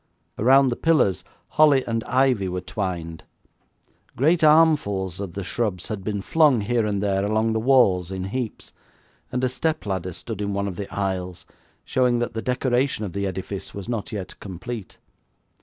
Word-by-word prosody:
Around 135 +4 +5
the 120 - -1
pillars 145 - +2 0.3
holly 145 -3 +4
and 115 -1 -2
ivy 130 -7 +2
were 90 0 -2
twined. 85 -5 -4 0.9
Great 160 +6 +2
armfuls 145 - +3
of 100 -4 -5
the 100 - -4
shrubs 95 0 -2
had 105 -4 -4
been 100 -1 -3
flung 150 -6 +4
here 115 +1 0
and 100 -1 -1
there 100 -1 +1
along 110 +2 +1
the 110 - 0
walls 110 -8 +3
in 95 -1 -4
heaps, 115 +4 -5 0.6
and 125 +1 -2
a - - +4
step 155 +4 -2
ladder 95 -2 -2
stood 105 +3 -6
in 100 0 -2
one 100 0 -1
of 95 - -5
the 100 +2 -6
aisles, 95 -3 -3 0.4
showing 125 -2 +2
that 120 0 -2
the 110 - -3
decoration 125 -2 0
of 90 - -6
the 100 0 -1
edifice 95 +1 -6
was 100 -2 -7
not 115 -4 -3
yet 95 -4 -6
complete. 100 +1 -7
105 Hz, 175 wpm, -23 LUFS, 95-125 Hz, 0.9 s, Around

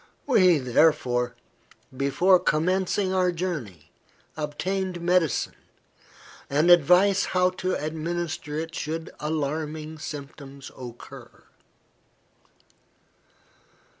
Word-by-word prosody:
We, 185 - +5
therefore, 125 -2 +2 0.6
before 175 +8 +3
commencing 185 +4 0
our 185 -1 +2
journey, 135 - -5 0.4
obtained 180 +5 -3
medicine, 170 -2 +1 1.0
and 150 +5 +3
advice 180 +4 +5
how 180 0 +2
to 185 0 0
administer 155 0 -4
it 165 +1 -4
should 160 0 -4
alarming 155 +1 -3
symptoms 140 -2 -9
occur." 120 -2 -11
160 Hz, 75 wpm, -25 LUFS, 145-180 Hz, 1.0 s, We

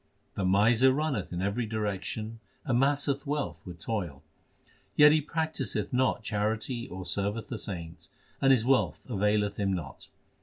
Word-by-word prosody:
The 100 - -3
miser 110 +7 +5
running 140 - -1
in 90 +1 -3
every 105 +4 -1
direction 110 +1 -3 0.3
amasseth 140 +2 +1
wealth 100 - -2
with 90 -1 -7
toil; 85 -8 -4 0.7
Yet 150 0 +8
he 155 0 +4
practiseth 160 -2 -2
not 125 -2 +1
charity 110 +4 -2
or 95 0 -7
serveth 100 +4 -1
the 120 - -4
saints, 85 -4 -7 0.3
and 135 - +5
his 120 -4 +4
wealth 135 0 +1
availeth 105 -2 +1
him 100 -1 0
not. 80 -8 -6
110 Hz, 145 wpm, -29 LUFS, 100-130 Hz, 0.7 s, Yet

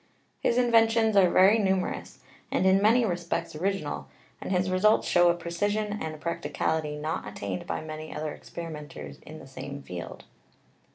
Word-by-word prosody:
His 235 - +1
inventions 225 -2 +4
are 190 -3 +6
very 195 +6 +6
numerous, 190 -2 -1 0.3
and - - +1
in 190 +1 +5
many 230 +3 +5
respects 170 -3 -2
original, 155 - -2 0.3
and - - -5
his 185 0 +1
results 210 +4 +3
show 175 -1 +5
a 170 - +3
precision 205 +5 -1
and 155 -1 -5
practicality 155 -1 -2
not 155 -6 -3
attained 100 -2 -5
by - - -2
many 155 0 -7
other 150 0 -4
experimenters 155 -4 -8
in 155 - -11
the - - -11
same 140 +1 -8
field. 90 -1 -7
175 Hz, 155 wpm, -27 LUFS, 155-200 Hz, 0.3 s, are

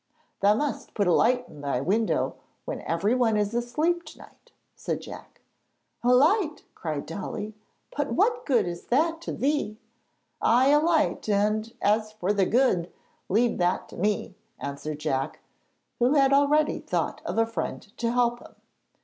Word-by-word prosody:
'Thou 205 +1 +4
must 290 +4 -3
put 205 - +1
a 175 - +3
light 250 +5 +3
in 145 - -12
thy 140 -3 -1
window 205 - +1 0.3
when - - -4
everyone 220 +6 +2
is 210 +1 0
asleep 305 +9 0
to - - -13
night,' - - -17 0.2
said - - -3
Jack. - - -11 0.6
'A 245 - +4
light!' 305 - +3
cried 155 -4 -4
Dolly; 205 +4 -5 0.4
'but 290 0 -1
what 470 +5 +2
good 260 -5 +3
is 175 -1 -6
that 325 +6 +1
to - - -5
thee?' 275 -6 -1 0.6
'Ay, 250 +4 +4
a 295 +1 +6
light; 315 -7 +1
and 215 +2 +1
as 215 +1 +2
for 205 -1 -1
the 195 -3 +2
"good," 215 -8 +2 0.4
leave 225 +3 +2
that 175 0 +1
to - - -11
me,' 205 0 -1 0.2
answered 145 +2 -5
Jack, 135 -3 -2 0.6
who 250 +5 +3
had 275 -1 +4
already 290 +2 +3
thought - - -2
of - - -4
a 225 - +4
friend 225 -1 -5
to 235 -1 0
help 240 0 +1
him. - - -15
230 Hz, 160 wpm, -26 LUFS, 200-280 Hz, 0.6 s, a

